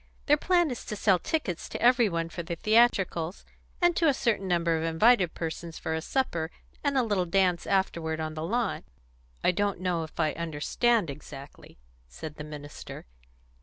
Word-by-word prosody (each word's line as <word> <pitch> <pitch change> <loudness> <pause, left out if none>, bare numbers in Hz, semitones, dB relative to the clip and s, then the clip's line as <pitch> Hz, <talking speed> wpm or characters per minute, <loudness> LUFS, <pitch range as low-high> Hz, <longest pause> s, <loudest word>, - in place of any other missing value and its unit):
Their 295 - +5
plan 345 0 +2
is 245 - -5
to 210 - -4
sell 195 -3 +3
tickets 190 - -2
to - - -5
every 240 -2 +5
one 165 -1 -2
for 170 - -5
the 170 0 -4
theatricals, 195 -5 +2 0.4
and 350 -1 +5
to 330 - +3
a 285 - +4
certain 215 -6 0
number 170 -2 +2
of 160 - -1
invited 180 +3 +3
persons 165 0 -5
for 160 - -3
a 160 - -1
supper, 170 -8 -1 0.3
and 285 -2 +1
a 260 - +4
little 200 -5 0
dance 180 -1 +2
afterward 170 -5 0
on 155 0 -3
the 155 - -5
lawn." 225 +6 -1 0.6
"I - - +4
don't 200 0 -1
know 180 -2 0
if 160 +1 -9
I 155 -2 +2
understand 170 +5 0
exactly," 140 -1 -11 0.3
said 150 - -9
the 150 - -6
minister. 150 -1 -9
175 Hz, 180 wpm, -28 LUFS, 160-230 Hz, 0.6 s, Their